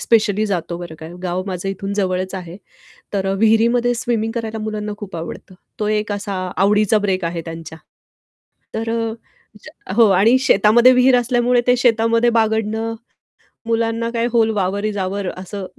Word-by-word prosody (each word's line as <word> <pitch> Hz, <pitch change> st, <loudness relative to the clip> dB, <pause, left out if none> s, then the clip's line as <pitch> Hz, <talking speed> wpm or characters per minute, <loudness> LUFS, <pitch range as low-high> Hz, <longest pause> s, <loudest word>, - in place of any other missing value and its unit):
Specially 215 Hz, -2 st, +2 dB
जातो, 175 Hz, -3 st, -3 dB
बरं 170 Hz, -2 st, -8 dB
का, 160 Hz, -, -9 dB, 0.2 s
गाव 180 Hz, 0 st, -2 dB
माझं 185 Hz, 0 st, -4 dB
इथून 195 Hz, +1 st, -4 dB
जवळच 185 Hz, -1 st, -1 dB
आहे. 180 Hz, -2 st, -7 dB, 0.6 s
तर 195 Hz, -1 st, -1 dB
अ, 195 Hz, -, +1 dB
विहिरीमध्ये 235 Hz, +3 st, +3 dB
स्विमिंग 230 Hz, -2 st, -1 dB
करायला 225 Hz, -1 st, -4 dB
मुलांना 210 Hz, -1 st, -4 dB
खूप 200 Hz, -4 st, -7 dB
आवडतं. 165 Hz, +3 st, -8 dB, 0.2 s
तो 210 Hz, -, -1 dB
एक 210 Hz, -1 st, -1 dB
असा 205 Hz, 0 st, -4 dB, 0.2 s
आवडीचा 210 Hz, +2 st, +3 dB
ब्रेक 190 Hz, -2 st, 0 dB
आहे 170 Hz, 0 st, -2 dB
त्यांच्या. 165 Hz, -1 st, -8 dB, 1.0 s
तर 225 Hz, +1 st, -2 dB
अ, 225 Hz, -1 st, -1 dB, 0.5 s
ज्या -, -, -11 dB
हो 230 Hz, -1 st, +6 dB
आणि 205 Hz, +6 st, +5 dB
शेतामध्ये 235 Hz, +1 st, +5 dB
विहीर 250 Hz, 0 st, +5 dB
असल्यामुळे 245 Hz, 0 st, +2 dB
ते 250 Hz, 0 st, +4 dB
शेतामध्ये 230 Hz, -1 st, +3 dB
बागडणं, 220 Hz, 0 st, 0 dB, 0.7 s
मुलांना 230 Hz, 0 st, 0 dB
काय 235 Hz, 0 st, 0 dB
व्होल 225 Hz, -2 st, +3 dB
वावर 200 Hz, +1 st, -1 dB
इस 210 Hz, -1 st, -2 dB
अवर 195 Hz, +1 st, -2 dB
असं 190 Hz, +1 st, -6 dB
215 Hz, 160 wpm, -19 LUFS, 190-230 Hz, 1.0 s, हो